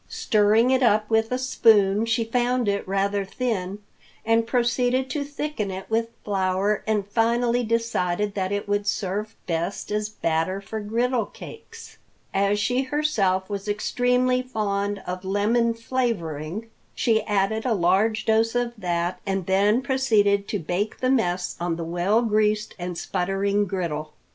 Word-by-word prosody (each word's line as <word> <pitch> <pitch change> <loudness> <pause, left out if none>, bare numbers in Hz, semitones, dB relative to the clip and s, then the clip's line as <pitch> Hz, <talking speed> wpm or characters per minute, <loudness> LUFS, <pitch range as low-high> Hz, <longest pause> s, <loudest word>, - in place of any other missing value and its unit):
Stirring 215 +3 +3
it 260 0 +3
up 215 -3 +3
with 225 +1 +2
a 250 - +1
spoon, 225 -5 +3
she 230 0 +1
found 245 +1 0
it 200 -1 -1
rather 195 +1 0
thin, 195 -3 -3 0.5
and 225 0 +2
proceeded 250 +2 +1
to 295 - -1
thicken 285 -6 -4
it 190 0 -6
with 230 +1 +1 0.2
flour 195 +1 0
and 210 -2 +1
finally 235 +3 +1
decided 210 -4 0
that 190 -1 -2
it 205 0 -2
would 205 0 0
serve 205 +2 -2
best 170 +4 -3
as 210 0 -1
batter 165 -1 -1
for 220 +2 -6
griddle 230 +2 0
cakes. 455 0 -12 0.3
As 200 +1 +2
she 245 +5 +1
herself 240 -10 0
was 200 0 -5
extremely 250 +4 +1
fond 205 -5 -2
of 180 +1 -5
lemon 225 +4 +1
flavoring, 225 - -3 0.2
she 220 -2 +2
added 210 +1 0
a 250 - +1
large 195 +5 +2
dose 225 +1 +2
of 245 -1 0
that, 175 -1 -1
and 195 -2 -2
then 205 +6 +2
proceeded 210 -7 +2
to 210 - -1
bake 185 +5 -3
the 255 0 +1
mess 180 -8 0
on 170 -1 -1
the 165 - -5
well 180 +7 +1
greased 215 -1 +1
and 175 -1 -4
sputtering 200 +4 0
griddle. 160 -5 -3
210 Hz, 150 wpm, -24 LUFS, 195-235 Hz, 0.5 s, Stirring